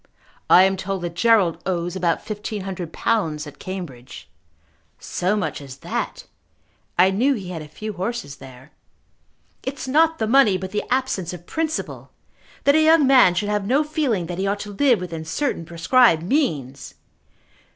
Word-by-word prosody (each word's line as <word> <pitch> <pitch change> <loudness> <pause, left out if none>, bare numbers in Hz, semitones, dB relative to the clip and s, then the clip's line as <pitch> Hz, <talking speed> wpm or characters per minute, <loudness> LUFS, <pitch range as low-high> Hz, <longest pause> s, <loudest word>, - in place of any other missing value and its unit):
"I 180 - +8
am 190 0 +2
told 190 -1 -4
that 170 -1 -4
Gerald 195 -3 +3
owes 175 -1 -2
about 175 -3 -1
fifteen 210 -1 -5
hundred 185 -3 -6
pounds 160 -10 -1
at 150 - -12
Cambridge." 170 -11 -8 0.7
"So 185 +3 -1
much 160 -8 -3
as 135 -2 -10
that! - - -4 0.7
I 185 +2 +5
knew 255 +8 +2
he 190 -6 -7
had 170 -3 -5
a 155 - -9
few 215 +8 -7
horses 190 -6 -4
there." 130 +2 -14 0.9
"It 265 +1 -4
is 260 - -6
not 320 +4 +3
the 220 - -1
money, 225 -4 +4
but 190 0 -6
the 210 - -2
absence 250 -9 -1
of 175 -1 -10
principle, 320 - -4 0.5
that 280 - +5
a 315 - +4
young 315 -1 +5
man 255 -9 +6
should 205 +3 -1
have 210 -1 -1
no 275 +6 +3
feeling 285 - -1
that 175 +1 -6
he 195 - 0
ought 200 +1 -1
to 205 -1 -7
live 245 0 +3
within 165 -3 -6
certain 170 - -2
prescribed 170 +2 +3
means! 155 - -2
190 Hz, 170 wpm, -22 LUFS, 170-245 Hz, 0.9 s, I